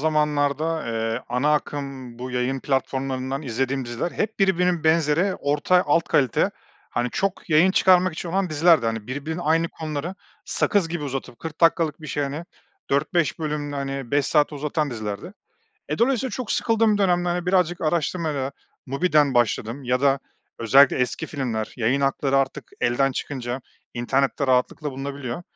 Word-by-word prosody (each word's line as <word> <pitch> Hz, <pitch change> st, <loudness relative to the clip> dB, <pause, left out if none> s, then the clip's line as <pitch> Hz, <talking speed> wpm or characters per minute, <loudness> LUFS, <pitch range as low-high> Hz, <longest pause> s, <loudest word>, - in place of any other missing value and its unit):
zamanlarda, 150 Hz, 0 st, +1 dB
eee, 115 Hz, +1 st, -2 dB
ana 125 Hz, +5 st, +1 dB
akım 135 Hz, -5 st, -4 dB
bu 130 Hz, +1 st, -5 dB
yayın 125 Hz, +2 st, -1 dB
platformlarından 135 Hz, 0 st, -2 dB
izlediğim 130 Hz, +1 st, -1 dB
diziler 120 Hz, +8 st, -3 dB
hep 220 Hz, +1 st, -2 dB
birbirinin 180 Hz, -4 st, +2 dB
benzeri 160 Hz, +4 st, +3 dB
orta 150 Hz, +6 st, +2 dB
alt 165 Hz, +3 st, +3 dB
kalite, 130 Hz, -5 st, +2 dB, 0.4 s
hani, 120 Hz, 0 st, -1 dB
çok 195 Hz, -2 st, -2 dB
yayın 165 Hz, +4 st, +5 dB
çıkarmak 185 Hz, -1 st, +4 dB
için 170 Hz, +2 st, -6 dB
olan 185 Hz, 0 st, 0 dB
dizilerdi. 155 Hz, -5 st, +4 dB
Hani, 115 Hz, -2 st, -3 dB
birbirinin 150 Hz, +6 st, -4 dB
aynı 165 Hz, +1 st, +2 dB
konuları 155 Hz, +3 st, -5 dB, 0.3 s
sakız 200 Hz, -5 st, +1 dB
gibi 165 Hz, -3 st, -3 dB
uzatıp 135 Hz, -3 st, -5 dB
40 160 Hz, 0 st, -8 dB
dakikalık 165 Hz, -2 st, +3 dB
bir 155 Hz, -, -8 dB
şey, 145 Hz, -, -2 dB
hani, 145 Hz, +4 st, -4 dB, 0.5 s
4-5 145 Hz, +2 st, +1 dB
bölümde, 150 Hz, -2 st, -3 dB
hani, 135 Hz, -2 st, -4 dB
5 145 Hz, -1 st, +2 dB
saate 150 Hz, -1 st, +2 dB
uzatan 150 Hz, 0 st, -1 dB
dizilerdi. 110 Hz, -, -5 dB, 0.6 s
Eee, -, -, -2 dB
dolayısıyla 255 Hz, +1 st, +2 dB
çok 255 Hz, -4 st, -3 dB
sıkıldığım 225 Hz, -2 st, +2 dB
dönemde, 175 Hz, -2 st, +2 dB
hani, 175 Hz, 0 st, -2 dB
birazcık 180 Hz, -2 st, +2 dB
araştırmayla 155 Hz, -3 st, -1 dB, 0.3 s
MUBI'den 145 Hz, -1 st, +2 dB
başladım 120 Hz, +2 st, 0 dB
ya 125 Hz, +1 st, +1 dB
da 140 Hz, -1 st, +3 dB, 0.4 s
özellikle 135 Hz, +4 st, +5 dB
eski 125 Hz, -2 st, -1 dB
filmler 120 Hz, -7 st, -3 dB
yayın 125 Hz, +3 st, +1 dB
hakları 135 Hz, 0 st, +1 dB
artık 135 Hz, 0 st, -1 dB
elden 130 Hz, +3 st, +2 dB
çıkınca 130 Hz, -1 st, -4 dB, 0.3 s
internette 135 Hz, +3 st, 0 dB
rahatlıkla 130 Hz, +4 st, +1 dB
bulunabiliyor. 135 Hz, +1 st, -5 dB
145 Hz, 150 wpm, -23 LUFS, 130-165 Hz, 0.6 s, yayın